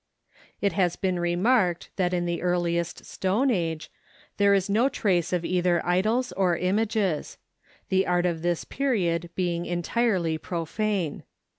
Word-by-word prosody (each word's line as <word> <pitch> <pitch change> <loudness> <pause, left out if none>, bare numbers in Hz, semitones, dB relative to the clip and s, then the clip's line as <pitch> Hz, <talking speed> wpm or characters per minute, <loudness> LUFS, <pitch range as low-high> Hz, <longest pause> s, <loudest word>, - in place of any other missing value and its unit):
It 200 - +1
has 180 -3 +1
been 185 -2 -1
remarked 175 +1 +1
that 180 -2 +1
in 175 -1 0
the 170 0 -2
earliest 175 -1 -1
Stone 215 +9 0
Age 165 -6 -2 0.5
there 200 0 +5
is 195 0 +1
no 225 +7 +3
trace 180 - 0
of 175 -2 0
either 180 -1 +2
idols 215 +8 +1
or 180 -3 +1
images; 200 -2 0 0.5
the 190 -1 +2
art 180 0 +2
of 170 -2 -1
this 175 0 0
period 180 -11 -1
being 175 -2 -1
entirely 175 -2 0
profane. 175 0 -2
180 Hz, 140 wpm, -26 LUFS, 175-200 Hz, 0.5 s, there